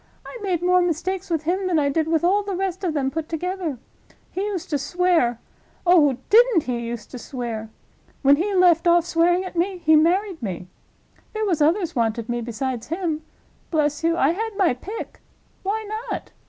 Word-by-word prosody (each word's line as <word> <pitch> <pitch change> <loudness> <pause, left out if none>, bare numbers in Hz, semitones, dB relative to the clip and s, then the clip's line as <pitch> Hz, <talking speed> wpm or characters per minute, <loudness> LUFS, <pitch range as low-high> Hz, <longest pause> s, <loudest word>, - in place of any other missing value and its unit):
I - - -9
made 365 -4 -1
more 360 0 +4
mistakes 360 +3 -2
with 325 -2 -1
him 370 +4 0
than 350 -3 +1
I 290 -2 +2
did 315 +2 0
with 325 -1 +1
all 390 +4 +3
the 400 -2 -4
rest 375 0 -3
of 335 -4 -1
them 270 -2 0
put 320 +1 -4
together. 350 -3 -3 0.5
He 375 - -3
used 400 -5 -4
to 290 - +1
swear—oh, 305 -1 +1
didn't 455 - +5
he 245 -2 -2
use 235 -1 -5
to 250 - -9
swear! 230 -3 -5 0.5
When 280 +1 +6
he 395 +5 -1
left 350 -2 +4
off 345 0 +5
swearing 350 +2 +2
at 370 - -8
me 365 +3 0
he 315 -2 +4
married 350 +3 +2
me. 185 -5 -5 0.7
There 435 0 -1
was 345 -7 0
others 340 +2 +2
wanted 230 -1 -1
me 240 0 -1
besides 235 +1 -4
him. 330 -2 -2 0.5
Bless 300 -1 0
you, 330 +1 +2
I 280 0 +3
had 435 +3 -4
my 370 -9 +3
pick. 395 - -8 0.4
Why 430 +3 -2 0.2
not? - - -5
335 Hz, 185 wpm, -23 LUFS, 280-370 Hz, 0.7 s, When